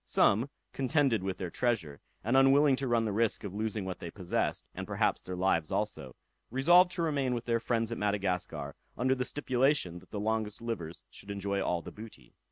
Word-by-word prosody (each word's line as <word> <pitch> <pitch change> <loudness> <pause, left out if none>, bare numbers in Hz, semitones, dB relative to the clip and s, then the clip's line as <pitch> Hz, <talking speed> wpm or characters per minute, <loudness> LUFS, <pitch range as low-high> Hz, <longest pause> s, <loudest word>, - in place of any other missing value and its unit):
Some, 115 +7 +3 0.2
contended 135 - +2
with 95 0 -3
their 90 -2 -4
treasure, 95 - -1 0.2
and 120 +4 +1
unwilling 135 +1 +6
to 135 - -2
run 115 -2 +2
the 105 - -1
risk 110 +2 0
of 100 -3 -5
losing 105 -1 -2
what 95 -1 -5
they 85 - -6
possessed, 90 0 -2
and - - -6
perhaps - - +1
their 90 - -5
lives 90 -4 +1
also, 65 -2 -2 0.3
resolved 175 +9 +6
to 170 - -1
remain 140 -6 0
with 120 - -4
their 115 -1 +1
friends 115 0 -1
at 115 - -3
Madagascar, 100 -3 -1 0.2
under 130 +3 +2
the 130 -1 -1
stipulation 130 - +1
that - - -20
the 105 - -4
longest 110 0 -1
livers 100 -9 -5
should 100 - -11
enjoy 100 0 -2
all 85 -3 -1
the - - -8
booty. 105 - -12
110 Hz, 195 wpm, -31 LUFS, 95-130 Hz, 0.3 s, unwilling